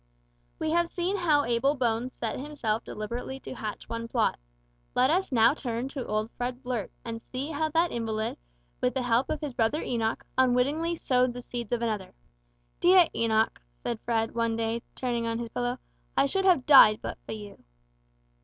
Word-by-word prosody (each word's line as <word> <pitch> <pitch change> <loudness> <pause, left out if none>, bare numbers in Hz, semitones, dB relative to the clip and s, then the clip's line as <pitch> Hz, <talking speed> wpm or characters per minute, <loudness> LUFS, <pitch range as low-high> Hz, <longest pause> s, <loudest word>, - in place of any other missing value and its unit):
We 315 - -1
have 340 0 +2
seen 360 +3 -1
how 310 -6 +3
Abel 240 +5 +2
Bones 245 -1 -1
set 225 0 -3
himself 255 -6 -2
deliberately 240 +5 -5
to - - -7
hatch 215 -4 -6
one 230 0 -4
plot. 230 - +1 0.6
Let 255 +3 +4
us 370 +1 +1
now 230 0 +5
turn 245 -3 -3
to 275 -3 -5
old 215 +1 -1
Fred 245 +2 -4
Blurt, 245 -5 -3
and 230 -1 -5
see 265 +6 -5
how 315 +1 0
that 330 +2 +2
invalid, 220 - -2 0.4
with - - +1
the 260 - 0
help 245 +2 +2
of 305 - -2
his 295 -4 -4
brother 245 +5 +1
Enoch, 225 -2 -1
unwittingly 275 +7 +2
sowed 255 -5 +2
the 245 - -7
seeds 240 -3 -6
of 240 -1 0
another. 210 -5 -3 0.6
"Dear 360 -1 +6
Enoch," 220 - +1 0.2
said 235 - -2
Fred 225 -1 0
one 230 -1 0
day, 230 +1 -1
turning 240 -2 -1
on 230 0 -1
his 235 -1 -4
pillow, 245 +2 -2 0.4
"I - - +5
should 385 +7 0
have 345 -9 +4
died 220 -7 +9
but - - -5
for - - -4
you." 210 -2 -10
245 Hz, 180 wpm, -28 LUFS, 230-285 Hz, 0.6 s, died